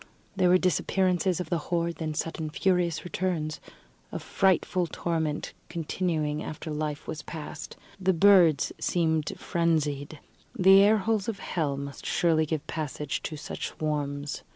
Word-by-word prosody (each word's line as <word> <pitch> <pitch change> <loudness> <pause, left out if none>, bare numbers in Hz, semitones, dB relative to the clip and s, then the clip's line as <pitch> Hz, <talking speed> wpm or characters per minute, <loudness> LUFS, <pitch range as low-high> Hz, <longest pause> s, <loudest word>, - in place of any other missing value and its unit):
There 185 -2 +3
were 180 - +7
disappearances 185 0 +1
of 175 -3 -5
the 170 - +2
horde, 170 -1 0
then 155 -2 -3
sudden 160 0 -3
furious 180 -1 +1
returns 175 -3 -2 0.5
a - - -3
frightful 185 -2 +1
torment 160 -3 -2 0.2
continuing 160 -3 -1
after 155 +1 -6
life 150 -1 -3
was 155 - -4
past. 155 -3 -8 0.2
The 190 0 +3
birds 175 -5 +5
seemed 160 -3 +1
frenzied. 155 -3 0 0.4
The 195 0 +7
air 210 +2 +5
holes 215 -1 0
of 220 - -3
hell 150 -8 -2
must 140 0 -7
surely 160 -2 +2
give 155 -1 -2
passage 150 -2 -3
to 155 - -5
such - - -5
swarms. 145 -2 -3
165 Hz, 140 wpm, -28 LUFS, 150-180 Hz, 0.5 s, were